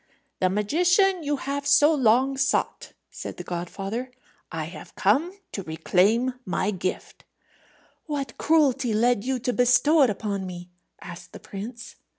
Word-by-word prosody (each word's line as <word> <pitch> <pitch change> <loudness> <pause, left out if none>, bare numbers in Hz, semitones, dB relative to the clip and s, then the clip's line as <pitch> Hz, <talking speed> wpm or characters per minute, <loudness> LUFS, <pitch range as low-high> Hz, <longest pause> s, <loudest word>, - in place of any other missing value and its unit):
"The 185 - +2
magician 350 - +2
you 295 -1 -1
have 280 +1 -4
so 290 +2 +5
long 260 0 +3
sought," 265 - -1 0.2
said - - -7
the - - -6
godfather. 195 +8 -5 0.4
"I 160 -2 -3
have 170 - -11
come 275 - +2 0.2
to 195 - -4
reclaim 195 +9 +1
my 190 +1 -1
gift." 185 -1 -5 0.8
"What 285 -3 -4
cruelty 270 -7 +2
led 235 -1 +2
you 265 0 -1
to 245 +1 -2
bestow 250 +6 +4
it 265 - +5
upon 200 -2 -3
me?" 180 0 -9 0.3
asked 175 -1 -10
the - - -9
prince. 230 +4 -9
245 Hz, 145 wpm, -25 LUFS, 195-280 Hz, 0.8 s, so